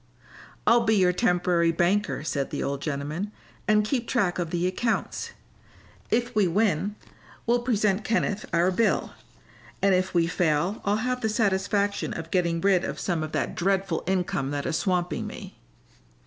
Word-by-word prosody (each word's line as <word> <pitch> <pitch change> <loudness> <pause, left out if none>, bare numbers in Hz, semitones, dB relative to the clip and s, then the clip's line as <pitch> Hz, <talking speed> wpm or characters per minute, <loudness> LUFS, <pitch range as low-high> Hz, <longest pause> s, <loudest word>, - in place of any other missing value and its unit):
"I'll 235 0 +5
be 220 -1 +3
your 180 -3 +4
temporary 175 -4 +2
banker," 180 +2 +1
said 140 -3 -2
the - - -3
old 140 0 -2
gentleman, 150 +7 -3 0.4
"and 210 0 +4
keep 240 +1 -1
track 195 -8 +1
of 170 -2 -2
the 175 +1 -1
accounts. 225 +5 -1 0.8
If 240 +1 0
we 210 -3 +3
win 205 +1 +1 0.5
we'll 240 +1 +2
present 210 -4 +1
Kenneth 215 -2 -1
our 175 +2 +3
bill, 225 +5 +1 0.7
and 195 -1 +3
if 185 +1 +1
we 170 -1 +4
fail 175 +3 0
I'll 200 +1 +2
have 250 0 -1
the 220 - 0
satisfaction 200 -1 0
of 165 0 -7
getting 170 -2 +1
rid 190 -2 +3
of - - -4
some 175 -4 -1
of 155 0 -4
that - - -1
dreadful 190 -1 0
income 180 -7 0
that 145 0 -3
is 165 - -1
swamping 180 -1 -1
me." - - -9
185 Hz, 160 wpm, -26 LUFS, 170-210 Hz, 0.8 s, I'll